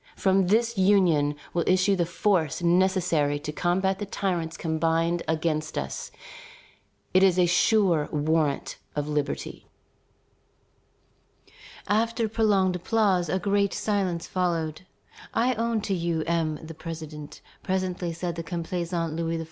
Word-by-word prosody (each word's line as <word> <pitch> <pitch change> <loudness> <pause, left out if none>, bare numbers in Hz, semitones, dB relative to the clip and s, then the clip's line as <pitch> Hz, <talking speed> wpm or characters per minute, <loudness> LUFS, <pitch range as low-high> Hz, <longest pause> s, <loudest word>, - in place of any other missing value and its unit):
From 190 -1 +2
this 230 +2 +2
union 175 -7 +3 0.2
will 170 - +1
issue 185 +2 +3
the 175 -3 0
force 175 -3 0
necessary 170 -5 +2
to 150 +1 -5
combat 190 +4 0
the 205 - -4
tyrants 175 -5 -2
combined 165 +1 0
against 155 -1 -1
us. 70 - -4 1.0
It 185 - +5
is 190 -2 +4
a 180 - +5
sure 175 -3 +3
warrant 150 -1 0 0.2
of 145 0 -2
liberty." 150 -1 -3 2.2
After 225 +2 +1
prolonged 205 -4 +2
applause 185 -2 +1
a 190 - +1
great 200 +1 +1
silence 190 -5 -1
followed. 170 -2 -2 0.5
"I 245 +3 +3
own 230 -1 -1
to 200 - -2
you, 170 -3 -1
M. 165 -2 0
the 165 - -8
President," 155 -2 -8 0.2
presently 185 -2 -2
said 170 +1 -3
the 170 - -4
complaisant 170 -1 -3
Louis 165 0 -1
XVI. - - -4
175 Hz, 130 wpm, -26 LUFS, 160-190 Hz, 2.2 s, It